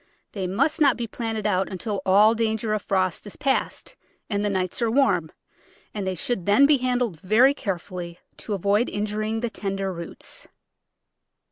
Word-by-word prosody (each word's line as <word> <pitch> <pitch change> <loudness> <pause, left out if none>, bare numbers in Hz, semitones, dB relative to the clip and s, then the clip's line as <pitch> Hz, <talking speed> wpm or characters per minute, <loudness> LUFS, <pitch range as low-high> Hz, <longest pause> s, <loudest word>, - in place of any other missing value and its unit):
They 190 -3 -3
must 275 - 0
not 280 -4 +5
be 240 - -2
planted 225 -1 -4
out 190 -2 +1
until 195 +2 -4
all 205 +4 +6
danger 220 -1 -1
of 215 - -1
frost 185 0 -1
is 205 - -8
past 270 -1 -1 0.4
and 205 0 0
the 205 - +1
nights 185 +2 -2
are 230 - +2
warm, 220 - +2 0.6
and 200 -3 -4
they 190 - -1
should 240 -6 -2
then 210 +8 +6
be 290 0 +5
handled 245 -8 -1
very 230 - +4
carefully 180 - -5 0.2
to 210 - -4
avoid 200 +5 +1
injuring 215 +2 -2
the 240 - -1
tender 195 -2 -3
roots. 170 -1 -9
210 Hz, 165 wpm, -24 LUFS, 190-235 Hz, 0.6 s, all